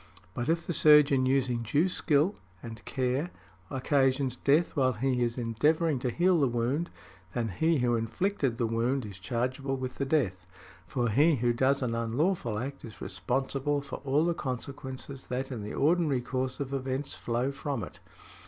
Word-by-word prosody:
But, 120 +6 -3
if 165 0 +1
the 175 - -2
surgeon 145 -4 +6
using 130 -3 +1
due 145 +10 +2
skill 165 0 +2 0.3
and 115 -2 -8
care 130 +5 -1 0.4
occasions 135 -1 +1
death 145 +6 +2
while 130 -3 +3
he 125 +2 0
is 120 0 0
endeavouring 145 +6 +1
to 125 - -1
heal 175 +6 +3
the 140 - +3
wound, 125 +8 -1 0.5
then 115 -2 0
he 160 - +1
who 120 -2 +2
inflicted 125 - -1
the 120 - +1
wound 115 +3 0
is 100 -2 -9
chargeable 130 +6 -2
with 130 -1 -5
the 140 - +1
death; 95 - 0 0.4
for 120 -2 0
he 150 +9 +4
who 120 -1 +1
does 135 +3 +2
an 120 -2 -1
unlawful 115 - 0
act 135 +5 -5
is 110 -3 -10
responsible 135 +3 -1
for 140 - -6
all 145 +3 +1
the 170 - +2
consequences 130 -1 -6
that 130 +2 -3
in 120 -4 -4
the 105 - -6
ordinary 150 -3 +2
course 130 +1 -3
of 140 -1 -4
events 135 +1 -2
flow 120 +3 -1
from 135 -4 -3
it. - - -9
130 Hz, 170 wpm, -29 LUFS, 120-145 Hz, 0.5 s, surgeon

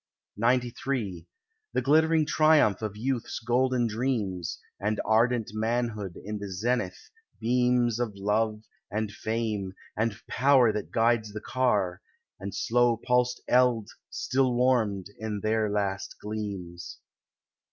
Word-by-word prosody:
XCIII 120 -4 0 0.5
The - - +1
glittering 160 +2 +4
triumph 155 - +4
of 105 -1 -4
youth's 125 +1 -2
golden 125 +1 +1
dreams, 110 -7 -2 0.2
And 105 +1 -1
ardent 115 0 +2
manhood 110 -4 -2
in 105 0 -4
the 100 -1 -6
zenith, 105 -1 -2 0.3
beams 120 0 +2
Of 115 -4 -2
love, 105 +2 0 0.3
and 105 +1 -2
fame, 110 -3 -3 0.2
and 110 0 -1
power 130 -4 +4
that 105 - -4
guides 115 -2 +1
the 105 - -4
car, 105 -8 0 0.4
And 100 +1 -6
slow 120 0 +2
pulsed 125 +1 +1
eld 125 -4 +3 0.2
still 130 -1 0
warmed 110 -6 +1
in 105 -2 -3
their 110 0 +1
last 100 -1 -2
gleams. 95 -5 -6
110 Hz, 120 wpm, -28 LUFS, 105-125 Hz, 0.5 s, glittering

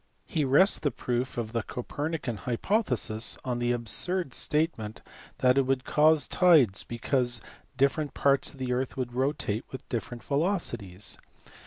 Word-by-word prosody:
He 160 -4 -1
rests 145 +10 +4
the 145 - +1
proof 125 0 -3
of 115 -2 -3
the 115 0 -1
Copernican 140 +2 -4
hypothesis 120 - 0
on 125 -2 -1
the 120 0 +1
absurd 130 - 0
statement 150 -9 -1 0.4
that 125 +1 +4
it 135 - +1
would 130 -1 0
cause 155 -3 +4
tides 155 - +4
because 120 0 -1 0.4
different 140 +2 +1
parts 140 -1 +2
of - - -16
the 130 -1 -2
earth 130 +2 -2
would 125 -2 -3
rotate 130 -4 -1
with 130 - -8
different 120 0 -4
velocities. 130 - -1
130 Hz, 145 wpm, -28 LUFS, 120-150 Hz, 0.4 s, rests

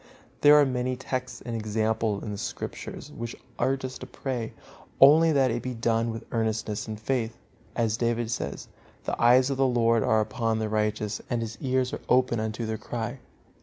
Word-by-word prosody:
There 145 0 +8
are 150 -1 +7
many 130 -1 -1
texts 130 0 -4
and 120 -2 -3
examples 110 -1 0
in 105 - -4
the 100 - -4
Scriptures - - -6
which 120 0 -6 0.2
urge 135 0 +1
us 130 - -6
to 130 - -8
pray, 125 -5 -4 0.5
only 155 +4 +8
that 135 -4 +3
it 120 +1 -2
be 130 -1 -4
done 115 0 +1
with 115 0 -5
earnestness 110 -2 -1
and 110 -1 -5
faith. 115 -1 -1 0.4
As 115 -2 +1
David 120 -1 0
says, 70 -11 -4 0.4
"The - - -3
eyes 125 +3 +6
of 135 - -1
the 135 0 +3
Lord 115 -2 +3
are 110 - +3
upon 110 +1 0
the 110 -1 -1
righteous, 105 -1 -1
and 120 -2 0
His 115 0 -7
ears 130 -1 0
are - - -4
open 125 -2 +3
unto 110 +1 -2
their 110 0 -3
cry." 120 +2 -4
115 Hz, 190 wpm, -27 LUFS, 110-130 Hz, 0.5 s, There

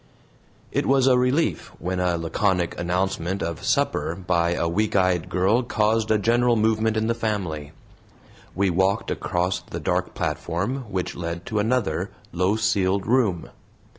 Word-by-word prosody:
It - - 0
was 135 -1 +4
a 130 -1 +5
relief 125 +6 +1
when 90 0 -3
a 90 -1 +1
laconic 90 +1 0
announcement 90 +1 -1
of 85 -2 -4
supper 80 - 0
by 85 -2 0
a 85 - 0
weak 105 +6 0
eyed 90 -3 +2
girl 95 +7 +2
caused 110 -2 +1
a 110 - +4
general 120 +3 +3
movement 110 0 +1
in 110 - +1
the 115 - +1
family. 95 -10 -3 0.8
We 95 0 +2
walked 95 +4 +1
across 90 0 -1
the - - -7
dark - - -1
platform, 115 +10 -2
which 95 -2 -2
led 85 0 -5
to 110 -3 -1
another 105 -6 0 0.2
low 90 +4 +1
ceiled 100 -3 +1
room. 110 -8 +1
95 Hz, 150 wpm, -24 LUFS, 90-110 Hz, 0.8 s, a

